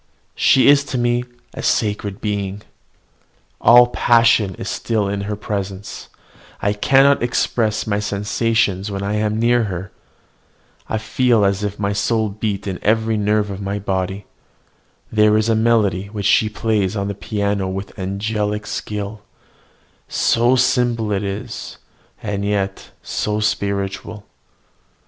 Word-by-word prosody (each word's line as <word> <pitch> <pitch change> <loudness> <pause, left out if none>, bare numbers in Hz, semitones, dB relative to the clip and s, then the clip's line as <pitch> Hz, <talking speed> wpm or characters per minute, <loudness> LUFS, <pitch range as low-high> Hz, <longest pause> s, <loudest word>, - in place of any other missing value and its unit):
She 130 - +4
is 140 0 +6
to 130 - -3
me 120 0 +1 0.3
a - - -6
sacred 105 -1 -1
being. 100 -1 -3 1.0
All 120 +1 +7
passion 115 -5 +3
is - - -7
still 110 -3 -1
in 100 0 -2
her 105 - -1
presence: 100 -1 -5 0.5
I 100 - 0
cannot 135 +6 +4
express 115 -2 0
my 105 -1 0
sensations 105 -1 0
when 100 -1 -4
I 100 +1 -2
am 105 0 0
near 120 0 +3
her. 95 -1 -5 1.0
I 110 - 0
feel 115 0 +2
as 100 +1 0
if 105 0 -3
my 100 0 -1
soul 110 +1 0
beat 105 -1 -3
in 95 -3 -4
every 110 +1 +1
nerve 105 0 +1
of 100 0 -6
my 100 +1 -3
body. 95 0 -3 0.9
There 105 0 +4
is 110 +1 +1
a 115 - +3
melody 110 -4 +2
which 100 -1 -5
she 110 +1 +4
plays 105 -3 -1
on 100 -1 -2
the 100 - -2
piano 100 -1 -2
with 95 +1 -5
angelic 105 +2 -2
skill, 105 0 -5 0.9
so 120 +2 +2
simple 120 -3 +1
is 100 - -4 0.5
it, - - -6
and 100 -1 -2
yet 100 -1 -2
so 105 0 -2
spiritual! 100 0 -2
105 Hz, 140 wpm, -19 LUFS, 100-110 Hz, 1.0 s, All